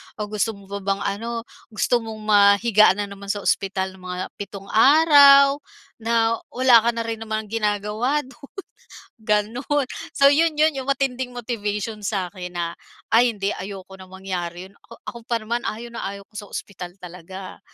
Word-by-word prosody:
O 215 - -7
gusto 215 +1 -1
mo 200 -1 -16
pa 200 - -3
bang 195 0 -2
ano, 230 +3 -3 0.3
gusto 240 +3 +1
mong 220 -1 -8
mahiga 205 0 +5
na 205 0 -4
naman 200 0 -10
sa 205 0 -2
ospital 190 -1 0
ng 190 - -16
mga 180 0 -4 0.2
pitong 200 0 -8
araw 280 +2 +7 0.4
na 230 0 +1 0.2
wala 250 -2 +6
ka 235 - +2
na 230 - -2
rin 225 -1 -4
naman 220 -1 -4
ginagawa 215 +6 0
do'n." 260 +1 -15 0.7
gano'n. 230 +7 0 0.2
So, 275 - +2
'yon 320 +1 +2
'yon, 310 +1 +4
'yong 270 0 -5
matinding 260 -2 -1
motivation 215 -2 -4
sa 190 -2 -2
akin 180 -2 -8
na, 170 -1 -2 0.4
"Ay 235 +2 +5
hindi, 200 -1 -2
ayoko 195 -1 -8
na 185 - -12
mangyari 185 -1 -6
'yon." - - -23
Ako - - -16
ako 235 - -7
pa 235 - 0
naman 235 +2 -3
ayaw 230 +3 -5
na 235 - -6
ayaw 200 0 -7
ko - - -40
sa 205 -1 -7
ospital 180 -2 -8
talaga. 180 +2 -10
215 Hz, 175 wpm, -22 LUFS, 195-240 Hz, 0.7 s, araw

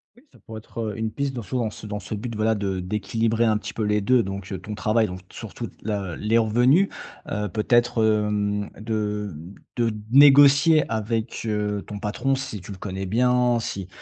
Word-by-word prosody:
Oui, 245 - -21
ça - - -20
pourrait 110 -1 -8
être, 115 - -11
heu, 105 - -8
une 110 0 -1
piste 140 +1 -2
dans 120 - -4
sous 115 +5 -4
en 120 - 0
dans 110 - -1
c 105 - -10
dans 105 0 -4
ce 100 - -7
but, 110 +2 -5
voilà, 110 +1 +2
de 100 -3 -2
d'équilibrer 110 +4 0
un 110 -1 +3
petit - - -7
peu 110 - -4
les 105 0 +2
2 125 +4 +3
donc 95 0 -6
heu, 95 - -4
ton 105 +3 -7
travail, 110 +3 +1
donc 90 +1 -7
surtout, - - -7
la 100 -5 -3
les 110 +2 +1
revenus. 125 - +4 0.4
Heu, 105 -1 -2
peut-être, 120 +3 +2
hem, 105 -1 0
de 105 -3 -2 0.4
de 115 -2 +1 0.2
négocier 145 +3 +7
avec, 110 +1 -2
heu, 105 -2 -1
ton 105 - -6
patron 120 +7 -1
si 110 -7 -5
tu 100 - -10
le 95 - -7
connais 95 0 -5
bien, 125 +2 +2
si, 95 -4 -5
110 Hz, 205 wpm, -24 LUFS, 105-120 Hz, 0.4 s, négocier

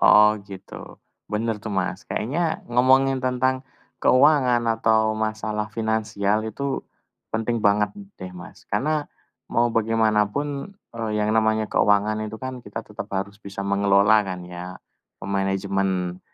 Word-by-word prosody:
Oh, 105 0 +7
gitu. 95 -1 -10 0.4
Bener 110 +1 0
tuh, 110 - -5
Mas. 95 -2 -2
Kayaknya 160 +8 -1
ngomongin 130 +2 +4
tentang 130 +1 +1 0.4
keuangan 130 -3 +4 0.2
atau 110 -1 +3
masalah 110 -1 -2
finansial 110 -2 0
itu 140 +5 -3 0.5
penting 115 +1 0
banget 105 0 +3 0.3
deh, 95 -1 -7
Mas. 90 - -12
Karena 150 +2 0 0.5
mau 120 +1 +3
bagaimanapun, 115 - 0 0.2
eee, 115 -2 -2
yang 105 0 +1
namanya 110 -1 +2
keuangan 105 +1 +2
itu 110 - -6
kan 130 -1 -6
kita 100 +2 -5
tetap 105 -1 -7
harus 100 +1 -3
bisa 100 -1 -8
mengelola 100 +2 +4
kan 95 -1 -5
ya, 90 +1 -8 0.4
memanajemen, 95 -2 -1
110 Hz, 125 wpm, -24 LUFS, 100-120 Hz, 0.5 s, Oh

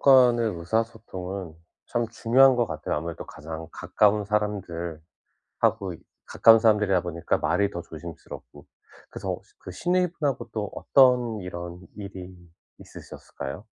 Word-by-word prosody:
간의 125 -4 +6
의사소통은 95 -2 -3 0.3
참 120 -1 -1
중요한 125 +3 +5
것 120 -2 +2
같아요. 80 -2 -3
아무래도 80 +2 -5
가장 80 +1 -8
가까운 105 0 +2
사람들하고 95 -6 -2 1.2
가까운 115 0 +6
사람들이다 105 -4 +3
보니까 85 -2 -1
말이 90 +6 +1
더 85 -3 -6
조심스럽고 85 0 -10 0.4
그래서 - - -4 0.2
그 90 - -9
시누이 180 - +1
분하고 145 -6 -2
또 105 -2 -3
어떤 125 -4 +3
이런 85 0 -7 0.2
일이 95 -3 -8 0.5
있으셨을까요? 70 +9 -9
100 Hz, 310 characters per minute, -26 LUFS, 85-115 Hz, 1.2 s, 간의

